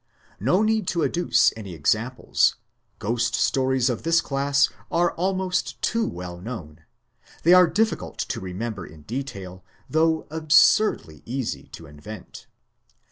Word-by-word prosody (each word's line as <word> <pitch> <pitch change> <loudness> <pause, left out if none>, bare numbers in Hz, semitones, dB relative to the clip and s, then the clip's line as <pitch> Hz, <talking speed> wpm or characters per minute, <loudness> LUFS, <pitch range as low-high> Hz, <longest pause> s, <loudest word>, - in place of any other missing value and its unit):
No 140 - +2
need 220 -3 +1
to 170 -2 0
adduce 175 0 +3
any 100 -6 -8
ex 75 -2 +3
amples: 120 +3 0 0.4
ghost 115 +2 -1
stories 130 -2 +1
of 120 -3 -1
this 165 0 +3
class 140 -1 +2 0.2
are 175 0 +2
almost 185 +1 -1
too 230 -1 0
well 90 0 -7
known; 85 -9 -8 0.6
they 175 - +6
are 180 -1 +7
difficult 220 +5 -1
to - - -3
remember 95 +2 -5
in 80 -2 -13
detail, 100 - -6 0.2
though 160 0 +1
absurdly 160 - +3
easy 130 0 -4
to 80 - -10
invent. 85 +7 -11
130 Hz, 135 wpm, -24 LUFS, -, 0.6 s, are